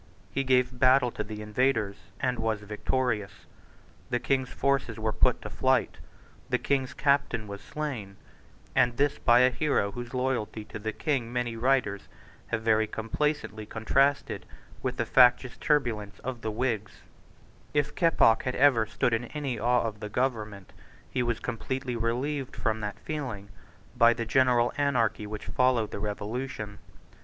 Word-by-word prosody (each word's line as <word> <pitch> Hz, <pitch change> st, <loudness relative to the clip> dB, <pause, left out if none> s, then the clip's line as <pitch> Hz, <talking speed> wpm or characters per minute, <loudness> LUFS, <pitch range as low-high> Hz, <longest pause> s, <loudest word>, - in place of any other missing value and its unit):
He 135 Hz, -, 0 dB
gave 125 Hz, -1 st, +2 dB
battle 130 Hz, -1 st, +5 dB
to 105 Hz, -, -4 dB
the 105 Hz, 0 st, -7 dB
invaders, 105 Hz, -2 st, +1 dB, 0.2 s
and 125 Hz, -1 st, -1 dB
was 110 Hz, -2 st, -1 dB
victorious. 105 Hz, 0 st, -2 dB, 0.6 s
The 120 Hz, -, +1 dB
King's 130 Hz, 0 st, 0 dB
forces 135 Hz, -4 st, 0 dB
were 110 Hz, 0 st, -1 dB
put -, -, +2 dB
to -, -, -5 dB
flight; -, -, +1 dB, 0.5 s
the -, -, +2 dB
King's 135 Hz, -2 st, -1 dB
captain 140 Hz, -5 st, +1 dB
was 100 Hz, 0 st, -8 dB
slain; 120 Hz, -11 st, -5 dB, 0.6 s
and 125 Hz, -2 st, +3 dB
this 145 Hz, 0 st, +1 dB
by 120 Hz, 0 st, +5 dB
a 130 Hz, 0 st, +5 dB
hero 140 Hz, -8 st, +1 dB
whose 120 Hz, +3 st, -7 dB
loyalty 125 Hz, -4 st, -1 dB
to -, -, -8 dB
the 110 Hz, +1 st, -3 dB
King 125 Hz, -1 st, -1 dB
many 120 Hz, -1 st, -2 dB
writers 115 Hz, -4 st, +1 dB, 0.4 s
have 110 Hz, -1 st, -2 dB
very 110 Hz, -1 st, +3 dB
complacently 110 Hz, 0 st, -2 dB
contrasted 135 Hz, +6 st, +1 dB, 0.3 s
with -, -, -2 dB
the -, -, 0 dB
factious 125 Hz, -1 st, +5 dB
turbulence 115 Hz, -9 st, 0 dB
of 125 Hz, -2 st, -4 dB
the 110 Hz, -, -2 dB
Whigs, 110 Hz, -2 st, -2 dB, 0.7 s
If 145 Hz, 0 st, 0 dB
Keppoch 165 Hz, -9 st, +4 dB
had 125 Hz, -, -2 dB
ever 130 Hz, -5 st, +4 dB
stood 115 Hz, +2 st, 0 dB
in 115 Hz, +2 st, 0 dB
any 135 Hz, -3 st, -4 dB
awe 120 Hz, +2 st, +2 dB
of 110 Hz, -2 st, -4 dB
the 105 Hz, -, -6 dB
government, 110 Hz, -5 st, -2 dB, 0.4 s
he 125 Hz, -, 0 dB
was 120 Hz, -2 st, 0 dB
completely 130 Hz, +2 st, -3 dB
relieved 125 Hz, +4 st, -2 dB
from 110 Hz, -1 st, -1 dB
that 105 Hz, -1 st, -4 dB
feeling 125 Hz, -10 st, -5 dB, 0.5 s
by 115 Hz, 0 st, +6 dB
the 115 Hz, -1 st, -4 dB
general 120 Hz, 0 st, +3 dB
anarchy 120 Hz, -7 st, +1 dB
which 105 Hz, 0 st, -6 dB
followed 125 Hz, -4 st, +1 dB
the -, -, -5 dB
Revolution. 105 Hz, +1 st, -4 dB
120 Hz, 155 wpm, -28 LUFS, 110-130 Hz, 0.7 s, by